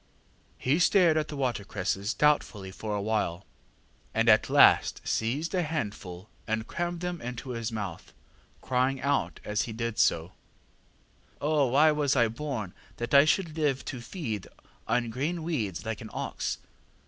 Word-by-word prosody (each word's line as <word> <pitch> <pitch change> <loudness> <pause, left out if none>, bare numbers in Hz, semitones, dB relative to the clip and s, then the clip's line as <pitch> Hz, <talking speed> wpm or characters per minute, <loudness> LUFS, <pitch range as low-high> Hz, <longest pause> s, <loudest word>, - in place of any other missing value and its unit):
ŌĆÖ 130 - +3
ŌĆ£He - - 0
stared 175 -3 +5
at 155 -1 +1
the 150 - -6
watercresses 105 -5 -2
doubtfully 115 -10 +1
for 105 +2 -4
a 100 - -1
while, 100 -4 -1 0.7
and 115 +1 +3
at 110 -1 +5
last - - +5
seized 140 - -1
a 185 - +2
handful 105 - -4 0.2
and 110 0 -1
crammed 175 +3 -3
them 180 -2 -3
into 125 +2 -6
his 115 -1 -3
mouth, 100 -6 -5 0.5
crying 130 +1 +1
out 140 +1 0
as 105 0 0
he - - -5
did 115 0 -3
so, 85 +2 +2 1.1
ŌĆśOh, 145 -4 +2
why 150 +4 +6
was 145 -2 +1
I 120 -3 +4
born 115 -6 -4 0.2
that 120 +2 -4
I 140 +1 +8
should 160 0 +1
live 145 -4 0
to 125 -3 -5
feed 120 - -5 0.4
on 120 -2 +1
green 155 +7 -2
weeds 105 - -2
like - - -4
an - - -8
ox? - - -3
125 Hz, 160 wpm, -28 LUFS, 110-150 Hz, 1.1 s, I